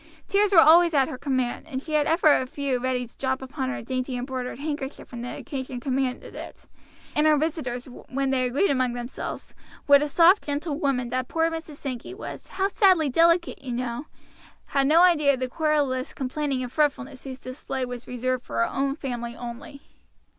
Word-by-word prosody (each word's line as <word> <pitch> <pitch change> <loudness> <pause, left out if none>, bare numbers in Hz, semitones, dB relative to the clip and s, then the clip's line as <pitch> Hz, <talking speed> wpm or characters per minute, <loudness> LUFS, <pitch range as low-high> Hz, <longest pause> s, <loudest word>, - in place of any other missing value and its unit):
Tears 410 0 +3
were 380 - +4
always 330 +1 +7
at 270 -2 +3
her - - -5
command, 260 -4 -1
and 265 -4 -3
she 310 +3 -7
had 300 -1 +3
ever 320 -2 +5
a 255 - +1
few 270 -1 -2
ready 250 0 -1
to 235 - -20
drop 260 0 0
upon 265 0 -4
her 270 - -4
dainty 255 +1 -3
embroidered 250 0 -4
handkerchief 290 -1 -5
when 240 -2 -6
the 245 - -5
occasion 260 -2 -5
commanded 260 0 -2
it; - - -9 0.5
and 300 +1 +4
her 305 -1 +5
visitors, 280 -6 -2 0.2
when 270 0 -1
they 255 -1 +2
agreed 280 +9 +2
among 255 -3 +1
themselves, 240 +1 -6 0.3
what 285 0 +7
a 295 - 0
soft 345 +7 +5
gentle 290 +1 -3
woman 255 -6 0
that 255 0 -2
poor 325 0 +1
Mrs. 325 -2 -6
Sankey 270 +5 -6
was, 420 - -8
but 390 +1 +1
sadly 370 - +4
delicate 335 +4 +3
you 250 -3 -4
know 245 +3 -3 0.6
had 275 -1 +2
no 325 +4 +6
idea 300 -6 +5
of - - -10
the 255 - -1
querulous 290 -3 0
complaining 270 0 -2
and 245 - -6
fretfulness 280 -2 -1
whose 265 -1 -7
display 260 0 -4
was 245 -1 -7
reserved 250 0 -2
for - - -8
her 115 0 +2
own 275 0 0
family 240 -5 -5
only. 245 +4 -8
270 Hz, 195 wpm, -25 LUFS, 255-305 Hz, 0.6 s, always